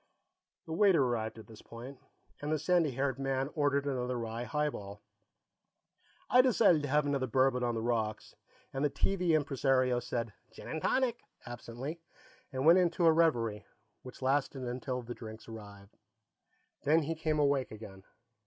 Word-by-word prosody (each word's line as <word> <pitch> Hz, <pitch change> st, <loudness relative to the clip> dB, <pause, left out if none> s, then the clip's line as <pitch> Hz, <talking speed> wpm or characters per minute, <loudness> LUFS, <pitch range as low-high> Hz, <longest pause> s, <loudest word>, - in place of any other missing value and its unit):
The 160 Hz, -, -5 dB
waiter 185 Hz, -4 st, +5 dB
arrived 115 Hz, -3 st, -2 dB
at 110 Hz, -, -10 dB
this 110 Hz, -2 st, -14 dB
point, 125 Hz, +3 st, -10 dB, 0.4 s
and 145 Hz, +1 st, -3 dB
the 155 Hz, -, +2 dB
sandy 165 Hz, +1 st, +2 dB
haired 135 Hz, 0 st, -1 dB
man 135 Hz, +1 st, -1 dB
ordered 145 Hz, -2 st, +1 dB
another 125 Hz, -2 st, -2 dB
rye 115 Hz, +1 st, -4 dB
highball. 115 Hz, -9 st, -3 dB, 1.2 s
I 250 Hz, -, +6 dB
decided 210 Hz, -, +4 dB
to 145 Hz, -, -3 dB
have 150 Hz, +2 st, +2 dB
another 140 Hz, -2 st, 0 dB
bourbon 130 Hz, +1 st, +2 dB
on 120 Hz, -1 st, 0 dB
the 110 Hz, -, -2 dB
rocks, 110 Hz, -3 st, -2 dB, 0.4 s
and 135 Hz, +1 st, -2 dB
the 150 Hz, -, +3 dB
TV 180 Hz, -2 st, +1 dB
impresario 135 Hz, -4 st, +2 dB
said, 115 Hz, -2 st, -3 dB, 0.2 s
"Gin -, -, -11 dB
and 160 Hz, -, -4 dB
tonic," 250 Hz, -3 st, +1 dB, 0.3 s
absently, 120 Hz, +6 st, -7 dB, 0.5 s
and 130 Hz, 0 st, -2 dB
went 170 Hz, +3 st, +8 dB
into 175 Hz, -1 st, +2 dB
a 165 Hz, -, +7 dB
reverie 120 Hz, -10 st, +1 dB, 0.3 s
which 130 Hz, +1 st, -11 dB
lasted 135 Hz, 0 st, 0 dB
until 125 Hz, +1 st, -3 dB
the 120 Hz, +1 st, -6 dB
drinks 110 Hz, -1 st, -10 dB
arrived. 100 Hz, -2 st, -11 dB, 0.9 s
Then 155 Hz, +3 st, +4 dB
he 160 Hz, +3 st, -2 dB
came 155 Hz, -1 st, -1 dB
awake 140 Hz, -3 st, +2 dB
again. 105 Hz, -3 st, -10 dB
135 Hz, 160 wpm, -32 LUFS, 120-150 Hz, 1.2 s, went